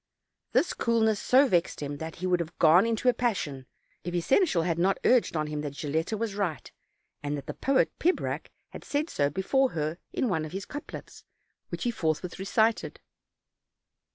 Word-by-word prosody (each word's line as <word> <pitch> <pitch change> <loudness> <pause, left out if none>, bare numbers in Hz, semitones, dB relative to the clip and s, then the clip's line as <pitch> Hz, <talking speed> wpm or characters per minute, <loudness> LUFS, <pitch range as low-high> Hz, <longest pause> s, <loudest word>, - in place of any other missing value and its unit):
This 340 - +2
coolness 220 -3 +1
so 270 +3 +5
vexed 175 -7 +1
him 145 0 -4
that 160 +2 -6
he 180 - -5
would 180 -1 +2
have 170 0 -5
gone 170 +7 +6
into 230 +2 -1
a 250 - +6
passion, 165 - -2 0.4
if 175 +1 -4
his 175 - -1
seneschal 270 - +3
had 170 -1 -1
not 190 +3 +2
urged 245 -9 +3
on 155 - 0
him 150 0 -4
that 145 -1 -6
Gil 145 - -4
letta 165 +8 -1
was 225 -1 -2
right, 195 -7 -3 0.5
and 145 0 -2
that 140 - -7
the - - -5
poet 270 -1 +2
Pibrac 360 +3 0 0.2
had - - -10
said 295 +3 -2
so 140 -1 +1
before 255 - +1
her 155 +2 -2
in 255 - 0
one 165 -7 0
of 155 - -7
his 195 +1 -4
couplets, 290 - -9 0.5
which - - -4
he 240 - +1
forthwith 165 -2 -2
re 195 - -4
cited. 220 +2 +1
180 Hz, 195 wpm, -28 LUFS, 155-230 Hz, 0.5 s, gone